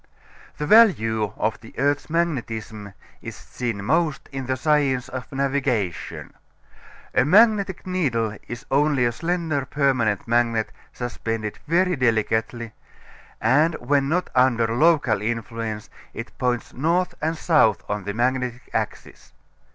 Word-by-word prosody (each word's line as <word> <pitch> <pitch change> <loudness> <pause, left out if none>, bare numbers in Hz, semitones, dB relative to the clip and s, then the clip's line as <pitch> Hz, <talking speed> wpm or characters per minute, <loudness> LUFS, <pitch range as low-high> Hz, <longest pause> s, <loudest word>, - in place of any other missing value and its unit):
The 150 - -2
value 115 - +4
of 110 +1 -1
the 110 - -15
earth's 145 +3 0
magnetism 115 - -3 0.3
is - - -7
seen 100 - -5
most 155 +3 0
in 135 -2 -5
the 130 0 -1
science 140 -3 +1
of 130 -1 -7
navigation. 135 - -2 0.8
A - - +4
magnetic 200 - +4
needle 125 - -1
is 120 +1 -7
only 140 -2 +3
a 120 - +2
slender 165 0 -1
permanent 130 -7 0
magnet 115 -1 +1 0.2
suspended 115 -3 -4
very 180 +3 +2
delicately, 115 -2 0 0.7
and 150 +8 +3
when 140 +2 0
not 180 +4 -1
under 125 -2 +3
local 140 -7 +3
influence 115 -1 -4 0.3
it 115 - -7
points 125 -2 -1
north 170 +7 0
and 160 +1 -1
south 150 - +2
on 105 -1 -3
the 100 - -3
magnetic 125 0 -1
axis. - - -5
125 Hz, 125 wpm, -23 LUFS, 115-150 Hz, 0.8 s, value